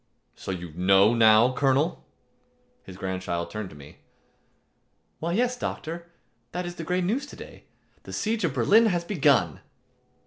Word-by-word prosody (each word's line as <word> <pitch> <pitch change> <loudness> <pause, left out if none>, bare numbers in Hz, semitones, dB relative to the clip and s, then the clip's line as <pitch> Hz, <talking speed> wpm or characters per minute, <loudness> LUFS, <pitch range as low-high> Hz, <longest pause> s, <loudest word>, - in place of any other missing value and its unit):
"So - - -10
you 90 -4 -5
know 95 +5 +4
now, 115 +2 +5
Colonel?" 135 +3 +1 0.8
His 95 -1 -12
grandchild 95 -3 -4
turned 105 -3 -5
to - - -14
me; 70 0 -14 1.2
"Why, 170 +2 -2
yes, 245 +5 +1
doctor. 170 -7 -5 0.5
That 180 +1 -3
is 175 - -5
the 165 - -5
great 180 +2 -1
news 245 +11 -1
to - - -11
day. - - -12 0.4
The - - -11
siege 220 0 -1
of 155 -6 -1
Berlin 210 - +5
has 175 -4 0
begun." 140 - +2
140 Hz, 150 wpm, -26 LUFS, -, 1.2 s, now